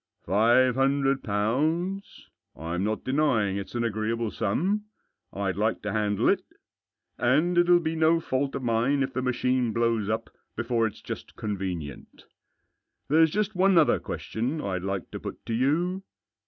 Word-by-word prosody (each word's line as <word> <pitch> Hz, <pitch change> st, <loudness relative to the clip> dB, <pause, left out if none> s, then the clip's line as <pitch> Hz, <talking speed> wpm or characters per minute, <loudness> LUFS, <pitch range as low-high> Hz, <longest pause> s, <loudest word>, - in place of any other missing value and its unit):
" -, -, -44 dB
Five 120 Hz, +7 st, +4 dB
hundred 135 Hz, +1 st, +1 dB
pounds? 155 Hz, -, -1 dB, 0.3 s
I'm 85 Hz, +4 st, -3 dB
not 110 Hz, +1 st, -2 dB
denying 130 Hz, -8 st, +1 dB
it's 100 Hz, +4 st, -7 dB
an 120 Hz, -, 0 dB
agreeable 115 Hz, 0 st, -1 dB
sum. 185 Hz, -, -1 dB, 0.5 s
I'd 95 Hz, -2 st, -2 dB
like 110 Hz, +2 st, 0 dB
to 105 Hz, -, -2 dB
handle 105 Hz, -1 st, 0 dB
it. -, -, +2 dB, 0.8 s
And 150 Hz, +9 st, +2 dB
it'll 175 Hz, 0 st, +5 dB
be 165 Hz, -1 st, -2 dB
no 160 Hz, +1 st, +3 dB
fault 135 Hz, -2 st, -2 dB
of 135 Hz, -, -4 dB
mine 120 Hz, +4 st, +1 dB
if 130 Hz, -, -4 dB
the 130 Hz, -, -1 dB
machine 125 Hz, -1 st, 0 dB
blows 115 Hz, -3 st, +1 dB
up 110 Hz, +1 st, -2 dB, 0.2 s
before 115 Hz, -1 st, 0 dB
it's 105 Hz, -, -10 dB
just -, -, -7 dB
convenient 90 Hz, -, -5 dB, 0.8 s
There's 160 Hz, +2 st, +5 dB
just 210 Hz, +5 st, -1 dB
one 185 Hz, 0 st, +3 dB
other 160 Hz, -, +4 dB
question 125 Hz, +8 st, -3 dB
I'd 95 Hz, -9 st, -3 dB
like 95 Hz, 0 st, -4 dB
to -, -, -6 dB
put -, -, -8 dB
to 115 Hz, -, -3 dB
you. 165 Hz, +10 st, +1 dB
120 Hz, 155 wpm, -27 LUFS, 105-155 Hz, 0.8 s, it'll